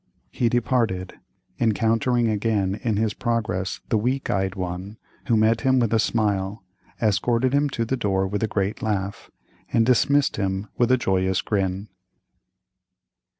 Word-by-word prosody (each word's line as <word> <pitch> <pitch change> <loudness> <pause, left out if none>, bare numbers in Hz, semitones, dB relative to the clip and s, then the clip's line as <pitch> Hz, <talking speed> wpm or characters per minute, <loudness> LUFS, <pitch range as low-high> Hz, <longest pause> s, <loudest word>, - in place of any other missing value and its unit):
He 120 - +1
departed, 115 -6 0 0.5
encountering 115 +2 +2
again 105 -2 0
in 110 -4 0
his 110 -1 0
progress 115 -6 -2
the 110 - +2
weak 130 +5 -1
eyed 95 -1 -1
one, 95 +3 -5 0.3
who 115 -3 +3
met 110 +1 +3
him 130 -1 +3
with 115 -3 +1
a 115 - +4
smile, 100 -3 0 0.4
escorted 115 +4 +1
him 145 +1 +2
to 115 -3 -2
the 130 +3 -1
door 95 -4 0
with 100 +1 -3
a 110 - +1
great 100 0 -2
laugh, 100 -2 -3 0.4
and 115 - +3
dismissed 140 +3 +3
him 95 +1 -2
with 120 0 +2
a 130 - +5
joyous 95 -4 +1
grin. 95 0 -1
110 Hz, 150 wpm, -24 LUFS, 95-120 Hz, 0.5 s, a